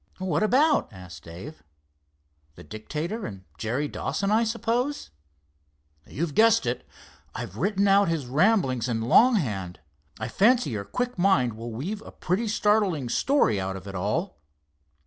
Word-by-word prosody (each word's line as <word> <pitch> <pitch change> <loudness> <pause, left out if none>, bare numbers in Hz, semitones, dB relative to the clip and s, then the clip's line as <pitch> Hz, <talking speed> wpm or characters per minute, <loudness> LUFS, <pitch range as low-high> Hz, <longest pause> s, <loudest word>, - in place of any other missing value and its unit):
"What 185 -5 -1
about?" 280 +8 +3
asked 90 -5 -12
Dave—"the 75 - -15
Dictator 150 - -5
and 95 -4 -9 0.2
Jerry 125 - -1
Dawson, 200 +6 -2
I 220 +2 +4
suppose?" 235 +5 -2 1.0
"You've 155 +1 -3
guessed 225 - +4
it. 120 +1 -3 0.5
I've 95 - -6
written 200 - +1
out 200 +1 +5
his 165 -5 -1
ramblings 135 - +2
in 115 -1 -1
long 235 - +5
hand. 100 - -3 0.4
I - - -3
fancy 240 - +3
your 100 -3 -4
quick 245 - -3
mind 155 - +3
will 115 +2 -7
weave 180 - -5
a - - -11
pretty 195 +7 -2
startling 205 - +1
story 120 - +2
out 95 0 -3
of 95 0 -9
it 100 - -7
all." 110 - -2
150 Hz, 145 wpm, -26 LUFS, -, 1.0 s, out